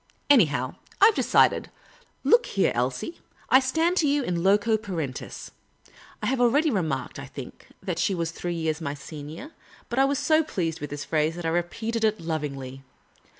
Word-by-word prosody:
Anyhow, 150 - +3 0.2
I 420 +3 +8
've - - -14
decided. - - +3 0.5
Look 475 +1 +4
here, 195 - +1
Elsie: 125 - -2 0.3
I 260 - +8
stand 320 +7 +1
to 310 - +3
you 285 0 +2
in 175 -6 -1
loco 205 +4 +3
parentis. 165 -11 -5 0.3
'" - - -22
I - - 0
have 260 -1 +1
already 285 +6 +3
remarked, 155 - -2
I 135 - -7
think, 135 -2 -10 0.2
that 175 -3 -3
she 195 - +1
was 165 -1 -2
three 175 0 -4
years 160 -1 -2
my 145 -2 -3
senior; 155 - -9 0.4
but 240 - -1
I 270 - +6
was 280 +1 0
so 315 +3 +3
pleased 165 - -3
with 150 - -4
this 145 0 -5
phrase 155 0 0
that 175 -1 -6
I - - +1
repeated 220 +7 -2
it 215 -1 +2
lovingly. 140 -5 -4
175 Hz, 185 wpm, -26 LUFS, 150-250 Hz, 0.5 s, I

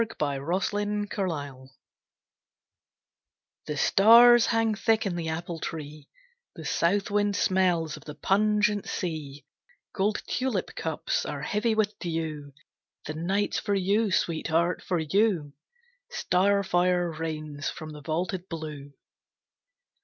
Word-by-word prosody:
Hora 145 +3 -1
Stellatrix 190 - -3 1.9
The 150 - -3
stars 235 +7 +7
hang 225 -1 +2
thick 220 +1 +1
in 190 -3 -1
the 165 -2 -3
apple 165 +1 -4
tree, 150 -2 -7 0.5
The - - -9
south 200 +4 +1
wind 205 0 +1
smells 175 -6 +1
of - - -15
the 150 - -8
pungent 210 0 +1
sea, 150 -5 -5 0.5
Gold 210 +1 0
tulip 255 -7 -2
cups 160 -2 -2
are 140 0 -5
heavy 215 +6 0
with 215 -1 0
dew. 160 -4 -4 0.5
The 155 - -4
night's 190 +6 -1
for 205 -2 -1
you, 200 +3 +1
Sweetheart, 170 0 0
for 180 - -1
you! 165 -2 +1 0.6
Starfire 180 - +1
rains 155 -2 -4
from 155 -1 -8
the 150 -1 -10
vaulted 175 +5 -3
blue. 150 -4 -7
175 Hz, 115 wpm, -27 LUFS, 155-205 Hz, 1.9 s, stars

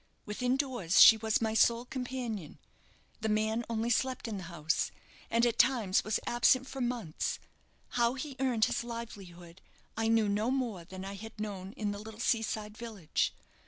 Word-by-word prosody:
Within 250 +5 0
doors 245 - +1
she 225 - +11
was 220 0 0
my 220 -1 0
sole 235 +2 +3
companion. 245 - -5 0.6
The 220 0 -1
man 220 +2 +1
only 230 +1 0
slept 255 +1 0
in 215 -3 -3
the 185 - -7
house, 160 -2 0 0.4
and 230 +1 +3
at 235 -1 0
times 230 -7 +3
was 215 - 0
absent 255 +2 +3
for 270 - -6
months. 240 -10 -2 0.5
How 240 +1 +1
he 275 0 -6
earned 245 -5 +3
his - - -1
livelihood 190 -7 -8 0.3
I 225 0 0
knew 225 -1 +3
no 210 +3 +1
more 240 -10 -2
than 185 +2 -8
I 195 - -5
had 220 +2 -10
known 200 -2 -5
in 210 -3 -2
the 205 - -5
little 220 +1 -10
sea 235 -1 +2
side 210 -1 -4
village. 220 -8 -2
225 Hz, 175 wpm, -31 LUFS, 205-240 Hz, 0.6 s, she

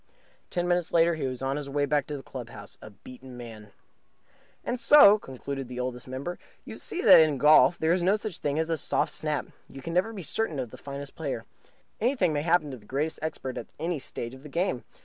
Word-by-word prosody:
Ten 175 0 -1
minutes 175 -1 0
later, 170 0 +4
he 155 -4 -2
was 130 0 -5
on 135 +1 -1
his 145 -1 -5
way 145 +1 0
back 145 0 0
to 150 - -4
the 135 - -10
club 125 -3 -8
house, - - -9
a - - -10
beaten 125 +5 -13
man. 110 -4 -10 0.9
And 245 - -2
so 215 -9 +8
(concluded 135 -2 -6
the 125 0 -7
Oldest 125 0 -4
Member) 135 +7 -5 0.3
you - - -8
see 365 - -3
that - - +9
in 155 -3 +2
golf 150 +5 +6
there 160 +1 +1
is 180 - +1
no 190 +4 +3
such 215 -4 -4
thing 145 0 -1
as 160 +1 0
a 165 - +1
soft 150 +1 +1
snap. 150 -1 -1 0.2
You 135 -1 -11
can 165 - -5
never 185 +6 +1
be 200 -5 -7
certain 195 -1 -1
of 125 -4 -4
the - - -10
finest 140 0 -7
player. - - -4 0.5
Anything 220 - +1
may 145 - 0
happen 165 -2 +2
to 130 - -7
the 105 - -19
greatest 150 +4 -2
expert 135 -5 -4
at - - -9
any 165 0 -2
stage 120 -2 -4
of 130 - -12
the 150 - -11
game. 165 -5 -1
150 Hz, 230 wpm, -27 LUFS, 130-175 Hz, 0.9 s, that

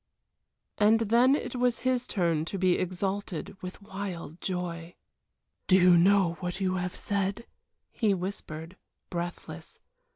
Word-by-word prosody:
And 215 +2 +5
then 235 +5 +5
it 290 - -4
was 245 -1 +1
his 255 -1 +1
turn 170 -6 +1
to 195 - -4
be 185 -1 +3
exalted 185 0 -3
with 185 +2 -8
wild 190 -5 -6
joy. 175 -2 -4 0.7
"Do 185 - +6
you 180 -1 +7
know 180 -1 +4
what 180 0 -4
you 185 -1 0
have 180 0 -3
said," 200 +3 -2 0.5
he 210 -4 +2
whispered, 180 -2 -6 0.3
breathless. 175 0 -6
185 Hz, 130 wpm, -29 LUFS, 175-205 Hz, 0.7 s, you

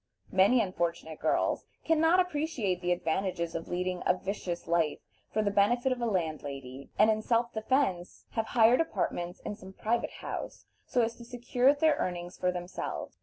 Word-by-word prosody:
Many 205 +6 +5
unfortunate 170 -4 -3
girls - - +1 0.2
can 325 -1 +3
not 325 +3 +5
appreciate 295 - 0
the 180 0 0
advantages 170 0 -1
of 165 - -4
leading 180 0 -2
a - - +4
vicious 185 -3 -4
life 165 -3 +2 0.3
for 215 - +1
the 205 - +1
benefit 240 +6 +3
of 250 -1 -1
a 235 - +1
landlady, 140 - -3
and 215 +1 +6
in 215 0 0
self 235 +1 +1
defense 220 -6 0
have 225 -1 -1
hired 235 +5 +6
apartments 180 - -2
in - - -4
some 190 -2 -11
private 230 +4 0
house, - - -6 0.2
so 245 -2 +2
as 230 +1 -1
to 240 - -10
secure 245 +2 +2
their 295 +1 +3
earnings 175 0 -3
for 180 - 0
themselves. 180 0 -5
200 Hz, 170 wpm, -30 LUFS, 175-245 Hz, 0.3 s, and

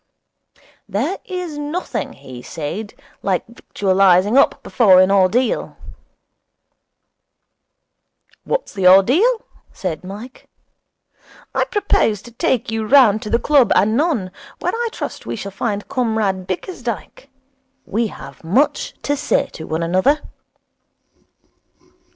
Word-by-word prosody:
'There 260 - -1
is 360 -5 -5
nothing,' 300 +5 -4
he 125 -1 -11
said, 170 - -6 0.3
'like 190 -3 -1
victualling 195 -2 +2
up 275 - +3
before 195 -6 +5
an 185 +1 +5
ordeal.' 200 +6 +1 2.7
'What's - - -2
the 190 -2 +2
ordeal?' 295 - +5 0.3
said 180 -4 -5
Mike. 210 +7 -10 1.1
'I - - +1
propose 395 - +1
to 240 - -12
take 235 0 -1
you 225 0 -2
round 230 -5 +5
to 210 - -6
the 235 - +3
club 275 -1 +3
anon, 220 - +1 0.3
where - - -2
I 470 +1 -1
trust - - -6
we - - -3
shall 200 -2 -6
find 205 0 -3
Comrade 220 -8 -1
Bickersdyke. 240 - -5 0.6
We 225 +3 -1
have - - -11
much 225 - +1
to 290 - 0
say 275 - 0
to 160 - -8
one 160 +1 -2
another.' 185 - +2
220 Hz, 115 wpm, -19 LUFS, 190-275 Hz, 2.7 s, before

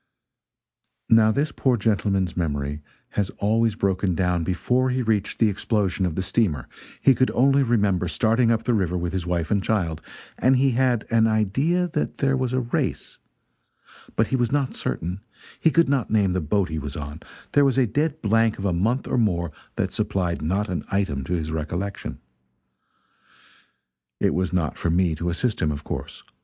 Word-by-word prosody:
Now 110 -1 +6
this 140 +5 0
poor 130 -3 +1
gentleman's 100 -4 0
memory 75 -3 -2 0.3
has 100 -2 -1
always 110 +1 +1
broken 95 -3 0
down 90 -1 +1
before 125 +9 +1
he 130 0 0
reached 105 -3 0
the 115 - +4
explosion 100 -2 0
of 80 - -4
the 95 - -1
steamer; 90 - 0 0.3
he 135 - +5
could 130 +1 +2
only 135 +3 +4
remember 105 -8 +1
starting 115 +9 +2
up 115 -1 +1
the 125 - +1
river 90 -5 0
with 85 0 -3
his 90 -2 -3
wife 85 -2 -1
and 100 -1 +2
child, 85 -8 -1 0.4
and 130 +1 +4
he 135 +1 +3
had 125 -2 +1
an 115 -1 +4
idea 135 - +1
that 150 - -2
there 135 -1 +2
was 130 -2 -1
a 130 0 +1
race, 120 - -3 1.0
but 110 - +1
he - - +1
was 120 -3 0
not 140 -2 0
certain; 90 +4 -3 0.4
he 160 - +4
could 170 +1 +3
not 135 -4 0
name 100 -4 +2
the 95 - 0
boat 95 +4 0
he 80 -1 -3
was 75 -1 -6
on; 75 +1 -6 0.3
there 145 - +4
was 135 -2 +2
a 130 - +4
dead 150 +7 -1
blank 115 +1 +2
of 100 - -5
a 95 - +1
month 115 +10 0
or 125 - +1
more 85 -7 0 0.2
that - - -2
supplied 95 -6 -1
not 95 +7 0
an 90 - -3
item 95 -9 -1
to 90 - -3
his 80 -3 -2
recollection. 85 +6 -4 2.0
It - - +2
was 90 0 -1
not 85 -4 -1
for - - 0
me 85 0 +2
to 85 +3 -3
assist 110 +7 -1
him, 75 - +1
of 75 0 -5
course. - - -6
100 Hz, 185 wpm, -24 LUFS, 90-120 Hz, 2.0 s, Now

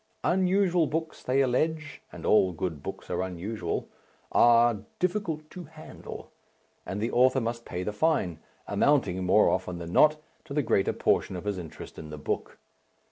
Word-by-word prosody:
Unusual 185 -2 +2
books, 160 +1 -3
they 130 +2 +2
allege 150 +4 -1
and - - -9
all 95 -4 +4
good 80 -3 -4
books - - -7
are - - 0
unusual 95 +4 -3 0.4
are 120 -1 +5 0.2
"difficult 175 -5 -1
to 180 -2 -8
handle," 155 +1 -10 0.6
and 95 - -3
the 115 +3 -1
author 130 +2 +4
must 115 0 -3
pay 90 - -4
the 105 - -3
fine 105 - +1 0.3
amounting, 100 -11 +2
more 95 +4 +5
often 90 -1 -1
than 85 0 -7
not, 155 0 +5 0.2
to 140 - -8
the 150 - +2
greater 100 -4 +2
portion - - +1
of 90 - -6
his 100 -2 -2
interest 80 -3 -9
in 80 - -8
the 75 - -7
book. 75 - -4
120 Hz, 165 wpm, -28 LUFS, 95-155 Hz, 0.6 s, are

